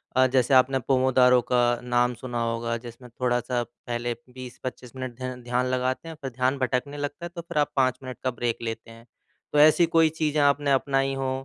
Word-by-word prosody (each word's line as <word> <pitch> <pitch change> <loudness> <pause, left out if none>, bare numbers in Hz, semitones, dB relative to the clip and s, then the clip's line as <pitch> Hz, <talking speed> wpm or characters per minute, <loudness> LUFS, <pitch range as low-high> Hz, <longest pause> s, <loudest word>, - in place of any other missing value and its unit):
अ, 130 0 +5
जैसे 130 0 +2
आपने 130 +1 +4
पोमोदारों 130 -1 +4
का 125 -1 +4 0.2
नाम 125 0 +1
सुना 120 0 -4
होगा। 115 0 -2
जिसमें 120 +1 -11
थोड़ा 120 -1 +2
सा 120 0 -2
पहले 120 0 -5 0.2
20-25 130 0 -8
मिनट 130 -2 -6
ध्या 130 0 -4
ध्यान 125 0 -1
लगाते 130 +4 -1
हैं 160 - -8
फिर 135 -2 -5
ध्यान 130 +3 0
भटकने 130 +2 -1
लगता 145 +4 -5
है - - -5
तो 170 - -4
फिर 170 -1 -7
आप 145 -1 +2
5 130 -2 +2
मिनट 130 -2 -7
का 130 - +1
ब्रेक 120 0 -2
लेते 115 0 -5
हैं। 115 +1 -15 0.5
तो 150 - +3
ऐसी 155 +3 +6
कोई 165 -1 +4
चीज़ें 155 -1 0
आपने 145 0 +2
अपनाई 135 0 +1
हो 135 -1 -2
130 Hz, 205 wpm, -25 LUFS, 120-135 Hz, 0.5 s, ऐसी